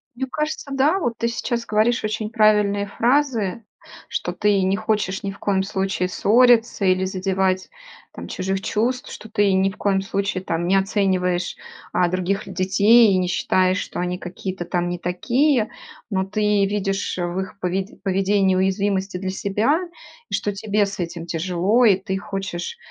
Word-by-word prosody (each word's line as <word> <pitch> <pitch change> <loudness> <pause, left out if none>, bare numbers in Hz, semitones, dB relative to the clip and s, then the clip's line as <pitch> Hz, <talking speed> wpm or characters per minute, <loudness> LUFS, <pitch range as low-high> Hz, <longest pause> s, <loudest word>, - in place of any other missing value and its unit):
Мне 265 +2 -3
кажется, 300 -2 -3
да. 295 +8 +2
Вот 240 -8 -1
ты 235 - 0
сейчас 235 0 -2
говоришь 220 +2 +1
очень 215 0 -2
правильные 210 -3 +3
фразы, 235 -3 0 0.5
что - - -3
ты 205 -2 +2
не 190 +1 +2
хочешь 210 -3 -1
ни 195 - -2
в 195 - -13
коем 195 -2 +1
случае 190 -1 -1
ссориться 235 +1 +3
или 185 0 +3
задевать 190 0 -1 0.4
там - - -8
чужих 190 +1 -2
чувств, 250 +6 -1
что 220 - -10
ты 205 -2 +2
ни 190 +1 +3
в 195 - -11
коем 195 -1 +1
случае 195 -1 -2
там 170 -1 -2
не 190 - +3
оцениваешь, 190 -3 0 0.4
а, 175 -1 +2
других 185 +2 -1
детей 200 +4 +5
и - - +3
не 180 -1 0
считаешь, 185 +1 +1
что - - -5
они 180 0 -2
какие-то 185 0 -6
там 175 0 -1
не 175 -1 -4
такие, 235 - +1 0.4
но 190 -2 0
ты 210 0 +1
видишь 195 -1 -2
в 175 0 -2
их 190 +1 -6
пове 185 +1 -1 0.2
поведении 195 0 +2
уязвимость 195 0 0
и - - -3
для 190 0 -3
себя, 210 - +1 0.5
и - - -9
что 205 - 0
тебе 205 0 0
с 195 -1 -7
этим 170 -1 -4
тяжело 180 +8 +1
и 200 -4 +6
ты 190 0 -3
хочешь 195 - -5
195 Hz, 170 wpm, -22 LUFS, 185-215 Hz, 0.5 s, и